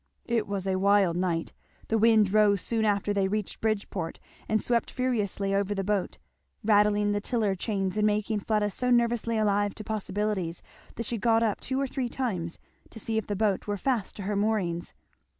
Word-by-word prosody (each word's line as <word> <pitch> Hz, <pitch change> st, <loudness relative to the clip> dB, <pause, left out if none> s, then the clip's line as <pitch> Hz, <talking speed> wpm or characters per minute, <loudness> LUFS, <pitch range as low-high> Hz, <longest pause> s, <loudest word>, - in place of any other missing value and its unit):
It 235 Hz, -2 st, 0 dB
was 200 Hz, -2 st, -3 dB
a 190 Hz, -1 st, 0 dB
wild 200 Hz, -3 st, +4 dB
night. 175 Hz, -2 st, -1 dB, 0.4 s
The 225 Hz, -, +2 dB
wind 215 Hz, -3 st, +4 dB
rose 210 Hz, -2 st, +4 dB
soon 225 Hz, -2 st, 0 dB
after 205 Hz, -1 st, +1 dB
they 195 Hz, -1 st, +1 dB
reached 210 Hz, 0 st, -3 dB
Bridgeport, 200 Hz, -6 st, -2 dB, 0.3 s
and 215 Hz, -, +3 dB
swept 235 Hz, +2 st, 0 dB
furiously 210 Hz, -6 st, -1 dB
over 200 Hz, +1 st, 0 dB
the 195 Hz, -, -1 dB
boat, 200 Hz, -1 st, -1 dB, 0.5 s
rattling 210 Hz, -1 st, +3 dB
the 205 Hz, 0 st, 0 dB
tiller 215 Hz, -3 st, 0 dB
chains 195 Hz, 0 st, -2 dB
and 210 Hz, 0 st, +3 dB
making 210 Hz, 0 st, 0 dB
Fleda 210 Hz, 0 st, 0 dB
so 250 Hz, +5 st, -1 dB
nervously 235 Hz, -1 st, +2 dB
alive 205 Hz, -1 st, +1 dB
to 215 Hz, -, -7 dB
possibilities 205 Hz, -4 st, -2 dB, 0.3 s
that 230 Hz, -, -3 dB
she 230 Hz, +1 st, -2 dB
got 225 Hz, +1 st, +3 dB
up 215 Hz, -3 st, 0 dB
two 260 Hz, +1 st, -2 dB
or 275 Hz, -, +1 dB
three 260 Hz, -2 st, -3 dB
times 185 Hz, -11 st, -3 dB, 0.3 s
to -, -, -13 dB
see 220 Hz, +1 st, -1 dB
if 220 Hz, -, -7 dB
the 205 Hz, -, -2 dB
boat 205 Hz, -1 st, 0 dB
were 205 Hz, 0 st, -1 dB
fast 235 Hz, -2 st, -1 dB
to 200 Hz, -, -6 dB
her 205 Hz, +2 st, -2 dB
moorings. 200 Hz, -5 st, -1 dB
210 Hz, 190 wpm, -28 LUFS, 195-225 Hz, 0.5 s, wild